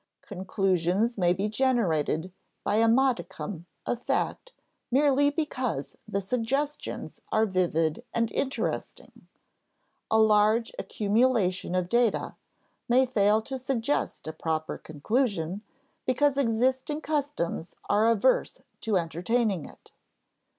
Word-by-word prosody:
Conclusions 190 +2 0
may 175 -3 +2
be 190 +4 0
generated 185 - 0 0.3
by 205 - +1
a 230 +1 +4
modicum 205 -7 0 0.2
of 240 - -2
fact - - -2 0.4
merely 285 +2 +4
because 260 - -3
the 200 -2 -1
suggestions 250 +8 -3
are 220 0 +3
vivid 175 -2 0
and 230 -1 0
interesting; 270 0 -4 0.8
a 220 - +3
large 220 +1 +4
accumulation 205 -4 +1
of 180 -1 0
data 235 +2 +1 0.6
may 255 +2 +5
fail 215 -3 +2
to 265 +2 -5
suggest 255 +1 -1
a 155 - -5
proper 160 -1 -3
conclusion 190 - -1 0.5
because 275 +2 +3
existing 260 +4 +1
customs 285 - -2
are 210 +2 +3
averse 230 +3 +2 0.2
to 215 -3 +1
entertaining 180 +3 0
it. - - -17
220 Hz, 110 wpm, -27 LUFS, 185-255 Hz, 0.8 s, may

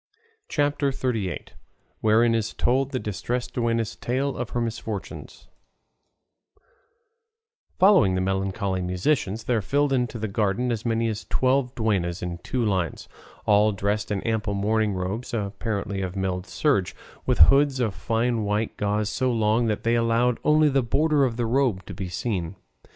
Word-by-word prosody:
CHAPTER 145 -1 +1
XXXVIII. 115 -8 -2 0.6
WHEREIN 115 +2 +4
IS 110 -1 -1
TOLD 130 +2 +1
THE 135 - -2
DISTRESSED 120 +3 -3
DUENNA'S 115 -2 -1
TALE 135 +3 -1
OF 125 -1 -4
HER 120 - -2
MISFORTUNES 110 -3 -6 2.3
Following 185 - +5
the 95 - 0
melancholy 95 0 -1
musicians 95 +4 -1
there 115 -1 0
filed 140 +6 +1
into 125 -2 0
the 110 0 -3
garden 105 +4 0
as 115 0 -3
many 115 0 +1
as 110 -1 -4
twelve 130 0 +1
duennas, 95 -7 -1
in 85 -1 -4
two 120 +6 -2
lines, 95 -7 -1 0.4
all 105 +1 +4
dressed 100 +2 -1
in 100 -2 -2
ample 110 -2 -1
mourning 105 +1 +1
robes 105 +8 -3
apparently 100 -1 -3
of 95 0 -4
milled 95 -1 -2
serge, 130 - 0 0.3
with - - +2
hoods 135 - +5
of 115 -5 0
fine 115 +3 0
white 105 +2 -1
gauze 105 0 0
so 130 +4 0
long 115 0 +2
that 105 -1 -1
they 115 - +2
allowed 115 +1 +2
only 155 0 +4
the 135 -1 +2
border 145 +4 +2
of 120 -3 -2
the 120 - 0
robe 115 -6 +1
to 100 - -8
be 95 0 -5
seen. 95 -3 -3
110 Hz, 155 wpm, -25 LUFS, 100-125 Hz, 2.3 s, Following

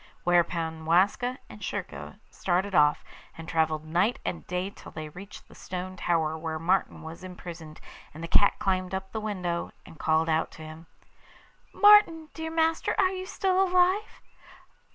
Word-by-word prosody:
Thereupon 165 -2 +1
Waska 200 +9 +2
and - - -12
Schurka - - -5
started 190 +2 -1
off, 150 -3 +4 0.3
and 165 0 -9
travelled 160 -1 0
night 180 +9 +1
and 170 - -4
day 180 +2 -2
till - - -13
they 155 -1 -7
reached 195 +6 -11
the - - -17
stone 185 0 -6
tower 165 -3 0
where 160 0 -4
Martin 180 +3 0
was 160 +3 -9
imprisoned; 170 -4 -9 0.3
and 160 +2 -10
the - - -3
cat 200 +4 +4
climbed 185 -1 -1
up 190 0 -5
the 220 - -4
window, 180 -5 -3 0.2
and 160 - -14
called 160 +1 +2
out 160 0 +1
to 160 - -11
him: 155 +1 -11 0.8
'Martin, 410 -7 +6
dear 320 0 -5
master, 325 0 +1
are 380 -1 +3
you 375 0 -5
still 380 -1 +1
alive? 370 +3 +2
180 Hz, 160 wpm, -27 LUFS, 160-225 Hz, 0.8 s, Martin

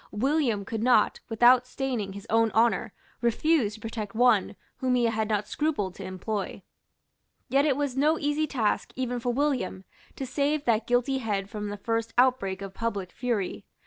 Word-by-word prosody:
William 240 -3 0
could 220 +1 -4
not, 250 +1 +3
without 245 +2 +5
staining 250 -7 -3
his 200 +1 -9
own 225 +1 +3
honour, 225 -3 +2 0.3
refuse 235 -1 +2
to - - -13
protect 220 -2 -6
one 245 +2 +3 0.2
whom 255 -1 +1
he 245 - +2
had 220 -1 0
not 210 -1 0
scrupled 285 - -1
to 195 - -9
employ. 190 +2 -4 0.9
Yet 275 +2 +3
it 275 -3 +2
was 285 -3 -1
no 300 +4 +3
easy 295 +1 0
task 230 -7 -1
even 245 -1 -2
for 245 +1 -1
William 255 -8 -1 0.3
to 270 - -4
save 285 +3 0
that 225 -1 +1
guilty 245 +2 +1
head 205 -4 -2
from 210 -2 -4
the 205 - -5
first 225 +2 -2
outbreak 200 -7 +2
of 195 -1 -7
public 200 -5 -3
fury. 235 -6 -2
235 Hz, 175 wpm, -27 LUFS, 210-265 Hz, 0.9 s, without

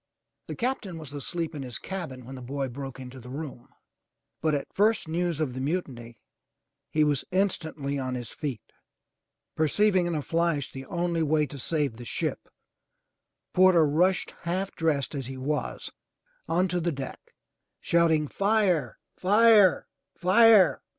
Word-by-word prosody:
The - - -5
Captain 235 -8 -2
was 155 -3 -9
asleep 165 +3 -3
in 145 - -5
his 125 -2 -5
cabin 160 -10 -6
when 130 - -9
the 130 - -8
boy 135 +2 -3
broke 135 +1 -7
into 130 0 -9
the 125 0 -11
room, 135 -3 -7 0.7
but 155 -1 +2
at 140 - -5
first 215 -2 +2
news 170 0 -1
of 150 -5 -1
the 130 - -5
mutiny, 130 -7 -4 0.7
he 155 - +2
was 145 -3 +1
instantly 160 -7 -1
on 130 -1 -3
his 120 -3 -6
feet. 135 -8 -5 0.9
Perceiving 185 +3 +2
in 170 - -1
a 150 - -2
flash 165 -4 0
the 135 0 -8
only 170 -1 -1
way 155 0 +2
to 140 0 -9
save 145 -4 -1
the 120 - -9
ship, - - -3 1.0
Porter 180 -3 +6
rushed, 175 +6 +2
half 185 +3 -2
dressed 155 -4 0
as 135 -4 -4
he 135 0 -7
was, 145 +3 -3 0.6
onto 180 +1 +1
the 170 0 0
deck, 135 -3 -6 0.6
shouting, 160 -3 +2
*Tire! 195 - +1 0.2
Fire! 205 -1 +5 0.3
Fire!'' 195 0 +6
155 Hz, 150 wpm, -27 LUFS, 135-180 Hz, 1.0 s, Porter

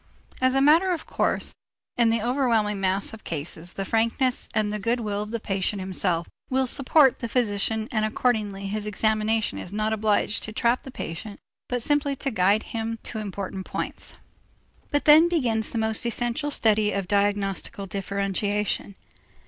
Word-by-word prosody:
As 255 0 +3
a 270 - +4
matter 320 +7 +5
of 340 -3 -3
course, - - -1 0.4
in 235 -1 +4
the 225 -1 +1
overwhelming 230 -5 +1
mass 195 +2 -1
of 220 - -11
cases 165 +2 -4
the 195 - -4
frankness 230 +4 0
and 215 -1 0
the 210 - -2
good 230 +4 0
will 205 -2 -2
of 210 - -5
the 230 +1 -3
patient 195 0 -1
himself 185 -2 -1 0.2
will 265 0 +2
support 270 +1 +4
the 235 - -4
physician 220 -2 +1
and 215 -2 0
accordingly 215 -3 0
his 210 +1 -2
examination 215 +1 0
is 180 - -6
not 215 +1 0
obliged 215 0 +1
to 215 - -6
trap 235 +2 +1
the - - -10
patient 200 -3 -7 0.3
but 245 -2 -1
simply 290 0 +1
to 275 +1 -2
guide 205 +1 +3
him 225 0 -4
to 220 - -5
important 195 -2 -5
points. - - -4 0.7
But 290 - 0
then 315 +3 +8
begins 235 -10 0
the - - -4
most 220 -1 +2
essential 240 +5 0
study 215 -6 +3
of 195 -2 -2
diagnostical 200 -1 0
differentiation. 200 +1 -2
215 Hz, 165 wpm, -25 LUFS, 200-240 Hz, 0.7 s, then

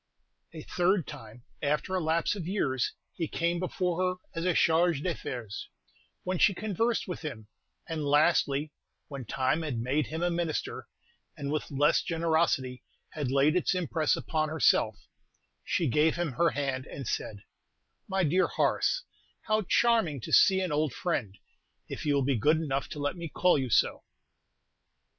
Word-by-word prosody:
A 160 -2 -9
third 180 -1 +1
time, 115 +2 -11 0.2
after 150 +5 -1
a 185 - +2
lapse 165 +3 +1
of 175 -5 -5
years, 135 - 0 0.2
he 165 - -3
came 170 +2 -1
before 180 -1 -1
her 185 0 +1 0.2
as 165 +1 -3
a 180 - +2
Chargé 165 -2 +3
d'Affaires, 125 - -5 0.5
when 185 -1 -2
she 195 - +4
conversed 220 +4 -1
with 180 - -5
him; 120 -9 -7 0.4
and 160 -2 -3
lastly, 145 0 +2 0.4
when 135 -4 -6
time 130 +7 0
had 150 -7 -3
made 130 +4 0
him 160 +2 -4
a 175 - +1
Minister, 170 -2 -3 0.5
and 140 0 -4
with 155 - -2
less 145 +1 +3
generosity 160 -6 0 0.3
had 145 -5 -3
laid 140 +4 +3
its 180 +1 +1
impress 165 -3 +1
upon 155 -1 -1
herself, 155 -5 +2 0.6
she 170 - 0
gave 150 +5 +3
him 170 -3 -1
her 165 +6 +2
hand, 135 -1 -3
and 135 -4 -7
said, 100 -2 -4 0.6
"My 190 -1 0
dear 180 +4 +3
Horace, - - +1 0.4
how 215 0 +1
charming 225 - +3
to - - -6
see 190 -1 +6
an 185 -3 -2
old 150 -2 0
friend, 115 - -2 0.5
if - - -6
you 145 - +3
will 140 -2 +1
be 140 -1 +2
good 150 +8 +4
enough 140 -4 -2
to 150 - -7
let 145 0 -1
me 170 -2 -6
call 180 +4 +3
you 130 -2 -2
so." - - +2
155 Hz, 165 wpm, -29 LUFS, 140-175 Hz, 0.6 s, see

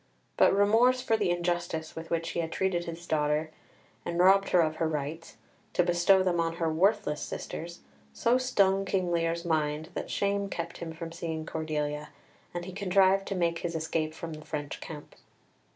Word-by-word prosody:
But - - +5
remorse 225 +6 +4
for 225 -3 +1
the 205 -4 +1
injustice 175 -2 -1
with 165 0 -7
which 165 0 -1
he - - -3
had 165 -1 -2
treated 175 -2 0
this 170 +1 -7
daughter, 150 0 0 0.5
and 170 - -3
robbed 195 +2 +5
her 180 - +5
of 155 -1 0
her 165 - +1
rights, 155 +2 -4 0.4
to 180 - +3
bestow 175 +2 +4
them 175 -2 +1
on 165 0 0
her 165 -2 0
worthless 190 -3 +2
sisters, 170 +1 -6 0.3
so 240 - +2
stung 195 -7 +2
King 185 -2 0
Lear's 170 0 0
mind 155 -1 0
that - - -4
shame 200 0 0
kept 170 -2 -5
him 170 -1 -5
from 165 0 -7
seeing 165 -2 -4
Cordelia, 150 -2 -3 0.4
and 175 0 -5
he 185 - -7
contrived 195 0 +3
to 195 - -2
make 170 -2 0
his 170 -1 -3
escape 160 -1 -2
from 165 0 -6
the 155 0 -9
French 145 -2 -5
camp. 150 -2 -9
170 Hz, 185 wpm, -29 LUFS, 160-190 Hz, 0.5 s, But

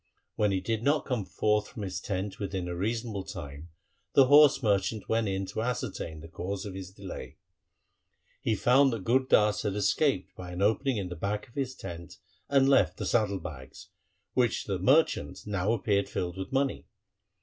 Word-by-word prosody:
When 105 -1 +2
he 95 -1 0
did 110 +2 -1
not 145 +4 +2
come 125 -7 -2
forth 105 +5 +1
from 105 - -8
his 90 -2 -4
tent 95 0 -3
within 95 -3 -3
a 90 - -4
reasonable 110 +1 -2
time, 75 -4 -8 0.5
the 135 - +8
horse 145 0 +6
merchant 100 0 0
went 115 -1 +1
in 95 0 -1
to 100 +3 -4
ascertain 105 -9 -3
the 80 - -10
cause 95 +4 -5
of 100 - -6
his 95 -1 -7
delay. 95 -9 -9 1.0
He 110 - +1
found 130 +5 +4
that 110 -5 -4
Gur 120 +5 +4
Das 105 -5 +3
had 100 -2 -2
escaped 105 +1 +1
by 90 -1 -8
an 90 - -4
opening 115 +4 +2
in 95 -3 -3
the 90 - -5
back 100 +5 -3
of 120 - -22
his 130 -2 -3
tent, 85 -1 -8 0.3
and 135 -1 +4
left 95 -10 +4
the - - -4
saddle 105 -4 +1
bags, 70 -7 -10 0.4
which 125 -3 +1
to 100 - -3
the 95 - -2
merchant 135 - +2
now 100 0 0
appeared 100 -3 +1
filled 90 -3 -3
with 95 0 -6
money. 135 0 0
100 Hz, 190 wpm, -29 LUFS, 95-115 Hz, 1.0 s, the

